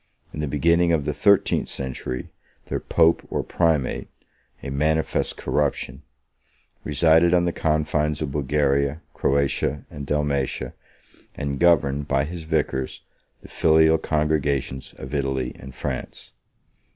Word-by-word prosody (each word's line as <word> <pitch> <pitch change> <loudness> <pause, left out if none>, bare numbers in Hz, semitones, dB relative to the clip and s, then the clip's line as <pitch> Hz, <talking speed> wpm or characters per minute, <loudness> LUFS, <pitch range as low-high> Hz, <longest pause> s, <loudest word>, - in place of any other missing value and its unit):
In - - -6
the 75 - -1
beginning 85 +5 +3
of 80 -4 +1
the 75 - -1
thirteenth 100 +7 +3
century, 65 -1 -5 0.3
their - - -3
pope 85 0 +3
or - - -1
primate 80 -6 0 0.6
(a 70 - -5
manifest 80 +3 0
corruption) 75 -2 -1 0.8
resided 80 +3 +4
on 85 0 +3
the 85 - +1
confines 75 -1 0
of 75 -3 -3
Bulgaria, 70 +1 0
Croatia, 70 0 0
and 70 -2 -7
Dalmatia, 70 -2 -1 0.6
and 70 -1 -3
governed, 75 -5 +3
by 70 0 +2
his 80 +1 -6
vicars, 70 -4 -1 0.4
the - - -11
filial 80 0 +4
congregations 75 -4 -1
of 65 +2 -8
Italy 65 -3 -1
and 65 0 -11
France. 65 0 -5
75 Hz, 125 wpm, -23 LUFS, 70-80 Hz, 0.8 s, resided